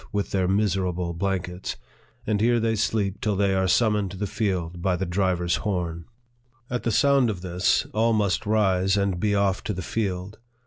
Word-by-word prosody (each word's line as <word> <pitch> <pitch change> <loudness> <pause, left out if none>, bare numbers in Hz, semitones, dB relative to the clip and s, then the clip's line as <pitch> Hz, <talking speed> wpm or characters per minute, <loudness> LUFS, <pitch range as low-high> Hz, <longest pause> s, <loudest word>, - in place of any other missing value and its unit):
11 - - -21
with 100 -1 -1
their 95 -2 +1
miserable 90 -3 0
blankets; 90 0 -3 0.5
and 105 -1 0
here 120 +1 +3
they 115 0 +1
sleep 100 -2 -1
till 105 -2 0
they 100 0 +2
are 95 0 +1
summoned 105 0 +2
to 95 - -9
the 105 - -2
field 90 -4 -2
by 95 0 +1
the 95 +2 -2
driver's 90 -1 0
horn. 85 -4 -3 0.7
At 125 - -1
the 115 - -1
sound 135 +3 +4
of 95 -5 -4
this, 90 0 +1
all 115 +2 +2
must 105 -1 0
rise, 95 -2 +2
and 100 -3 0
be 100 +2 +1
off 100 -2 +1
to 105 - -1
the 95 -1 -5
field. 95 -1 -3
95 Hz, 190 wpm, -25 LUFS, 90-105 Hz, 0.7 s, sound